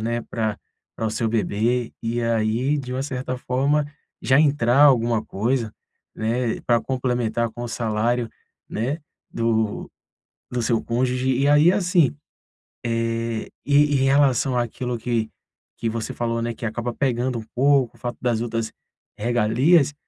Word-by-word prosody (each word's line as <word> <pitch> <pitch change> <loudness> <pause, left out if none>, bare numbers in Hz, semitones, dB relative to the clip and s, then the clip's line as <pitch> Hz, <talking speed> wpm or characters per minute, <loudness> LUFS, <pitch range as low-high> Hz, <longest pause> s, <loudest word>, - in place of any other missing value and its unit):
né, 115 +2 -1
pra 110 -3 -3 0.4
pra 115 - -2
o 110 - -1
seu 115 +1 -1
bebê 115 +2 0
e 115 +1 -1
aí 115 +5 +1
de 130 -3 -6
uma 130 +1 -2
certa 130 -2 -3
forma 140 +4 +1 0.4
já 130 +2 +4
entrar 140 -4 +3
alguma 120 -5 +4
coisa, 115 +2 -1 0.4
né, 115 +2 -1
pra 120 -1 +2
complementar 125 -3 -1
com 120 +2 -8
o 120 - -4
salário, 115 +1 0 0.4
né, 130 +9 -2 0.3
do 110 -2 -1 0.6
do 125 -1 -2
seu 115 -1 +1
cônjuge 125 +2 0
e 140 +1 +2
aí 150 +4 +6
assim, 175 -7 +2 0.7
eh, 115 -1 -2
e 145 +1 +5 0.2
em - - +3
relação 135 -2 +3
àquilo 120 +1 -2
que 115 -1 -1 0.5
que 115 - -1
você 110 0 -4
falou, 115 -1 -2
né, 120 0 -2
que 115 - -7
acaba 120 +2 -3
pegando 125 -1 0
um - - -7
pouco, 135 -1 +3
o - - -26
fato 120 -1 -4
das 120 -3 +1
outras 115 -1 -2 0.5
regalias, 120 +8 +3
120 Hz, 150 wpm, -23 LUFS, 115-130 Hz, 0.7 s, aí